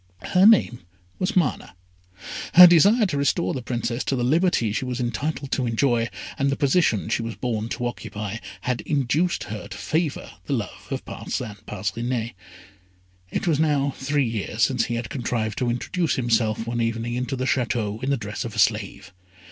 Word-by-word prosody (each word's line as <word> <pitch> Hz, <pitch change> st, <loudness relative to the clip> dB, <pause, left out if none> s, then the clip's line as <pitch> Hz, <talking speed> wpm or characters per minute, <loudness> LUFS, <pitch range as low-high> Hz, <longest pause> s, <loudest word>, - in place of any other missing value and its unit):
Her 185 Hz, +2 st, +7 dB
name 195 Hz, -, +4 dB, 0.4 s
was 185 Hz, -, -1 dB
Mana. 155 Hz, -, 0 dB, 0.8 s
Her 180 Hz, +1 st, +12 dB
desire 200 Hz, +7 st, +6 dB
to 165 Hz, -7 st, -1 dB
restore 140 Hz, +5 st, +1 dB
the 130 Hz, -, -3 dB
Princess 120 Hz, 0 st, -2 dB
to 135 Hz, -, 0 dB
the 125 Hz, -, -1 dB
liberty 155 Hz, -, +2 dB
she 125 Hz, -, -1 dB
was 125 Hz, -1 st, -3 dB
entitled 130 Hz, +4 st, -3 dB
to 130 Hz, -3 st, 0 dB
enjoy, 115 Hz, 0 st, +1 dB, 0.3 s
and 140 Hz, 0 st, +2 dB
the 140 Hz, -, +1 dB
position 140 Hz, -, +2 dB
she 115 Hz, +1 st, 0 dB
was 115 Hz, -1 st, -5 dB
born 115 Hz, -3 st, -2 dB
to 120 Hz, -, -3 dB
occupy, 105 Hz, -3 st, -5 dB, 0.2 s
had 125 Hz, -1 st, -1 dB
induced 150 Hz, +5 st, 0 dB
her 105 Hz, -1 st, -6 dB
to 100 Hz, -, -8 dB
favour 155 Hz, +9 st, -2 dB, 0.2 s
the -, -, -1 dB
love -, -, -4 dB
of -, -, -4 dB
Parcin 105 Hz, -2 st, -5 dB
Parcinet. 115 Hz, +4 st, -3 dB, 1.0 s
It -, -, -2 dB
was 160 Hz, -4 st, +2 dB
now 145 Hz, -3 st, +2 dB
three 140 Hz, -1 st, 0 dB
years 110 Hz, 0 st, -2 dB
since 120 Hz, +1 st, +2 dB
he 120 Hz, -, -3 dB
had 115 Hz, -2 st, -4 dB
contrived 115 Hz, -4 st, -2 dB
to 125 Hz, -, 0 dB
introduce 165 Hz, +8 st, -1 dB
himself 115 Hz, -3 st, +1 dB
one 120 Hz, 0 st, -2 dB
evening 115 Hz, +1 st, -1 dB
into 125 Hz, +1 st, -2 dB
the 130 Hz, 0 st, -2 dB
Château 115 Hz, -4 st, -1 dB
in 135 Hz, -, -1 dB
the 140 Hz, -, +2 dB
dress 105 Hz, -2 st, -5 dB
of -, -, -6 dB
a -, -, -8 dB
slave. -, -, 0 dB
125 Hz, 180 wpm, -24 LUFS, 115-140 Hz, 1.0 s, Her